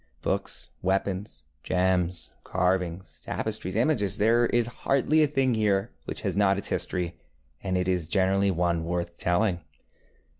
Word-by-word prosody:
Books, -, -, -3 dB
weapons, 95 Hz, +2 st, -1 dB, 0.2 s
gems, 90 Hz, -1 st, 0 dB
carvings, 90 Hz, -3 st, -1 dB
tapestries, 95 Hz, +2 st, -3 dB
imagesŌĆöthere 115 Hz, -, +2 dB
is 120 Hz, -1 st, +3 dB, 0.2 s
hardly 140 Hz, +3 st, +3 dB
a 150 Hz, -, +5 dB
thing 135 Hz, -3 st, +1 dB
here 105 Hz, 0 st, +1 dB
which -, -, -5 dB
has -, -, -2 dB
not 100 Hz, -1 st, +3 dB
its 100 Hz, -, -3 dB
history, 90 Hz, -2 st, -2 dB, 0.4 s
and 95 Hz, -2 st, -1 dB
it 90 Hz, 0 st, 0 dB
is 90 Hz, -4 st, 0 dB
generally 95 Hz, +1 st, +2 dB
one 85 Hz, -2 st, +1 dB
worth 85 Hz, 0 st, -3 dB
telling. 90 Hz, 0 st, +1 dB
95 Hz, 135 wpm, -27 LUFS, 90-105 Hz, 0.4 s, a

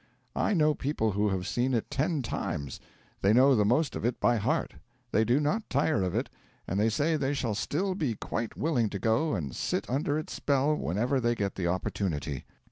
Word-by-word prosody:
I 215 Hz, -, +1 dB
know 155 Hz, -2 st, +4 dB
people 135 Hz, -6 st, -1 dB
who 105 Hz, +1 st, +1 dB
have 95 Hz, -2 st, -2 dB
seem 125 Hz, +1 st, 0 dB
it 115 Hz, -, -2 dB
ten 150 Hz, 0 st, 0 dB
times; 70 Hz, -, -4 dB, 0.4 s
they 100 Hz, +2 st, +4 dB
know 130 Hz, +3 st, +6 dB
the 105 Hz, -, +3 dB
most 125 Hz, +8 st, +2 dB
of -, -, -4 dB
it 120 Hz, +1 st, 0 dB
by 120 Hz, -, +3 dB
heart; 105 Hz, -, 0 dB, 0.4 s
they 110 Hz, -, +3 dB
do 120 Hz, +5 st, +3 dB
not 200 Hz, +10 st, -1 dB
tire 140 Hz, -5 st, +2 dB
of 90 Hz, -1 st, -1 dB
it; -, -, 0 dB, 0.4 s
and 95 Hz, -, -1 dB
they 110 Hz, +2 st, +3 dB
say 150 Hz, +8 st, +1 dB
they 140 Hz, 0 st, 0 dB
shall 120 Hz, -5 st, -1 dB
still 185 Hz, -, -1 dB
be 150 Hz, -, -1 dB
quite 115 Hz, +2 st, -4 dB
willing 125 Hz, -9 st, +1 dB
to 100 Hz, -, -4 dB
go 115 Hz, -, +1 dB
and 70 Hz, -9 st, -4 dB
sit -, -, -2 dB
under 145 Hz, +3 st, 0 dB
its 155 Hz, -, -5 dB
spell 140 Hz, +1 st, +1 dB
whenever 120 Hz, -, 0 dB
they 120 Hz, -1 st, +1 dB
get 100 Hz, -3 st, -2 dB
the 90 Hz, -3 st, -2 dB
opportunity. 85 Hz, -6 st, -2 dB
120 Hz, 210 wpm, -29 LUFS, 100-145 Hz, 0.4 s, know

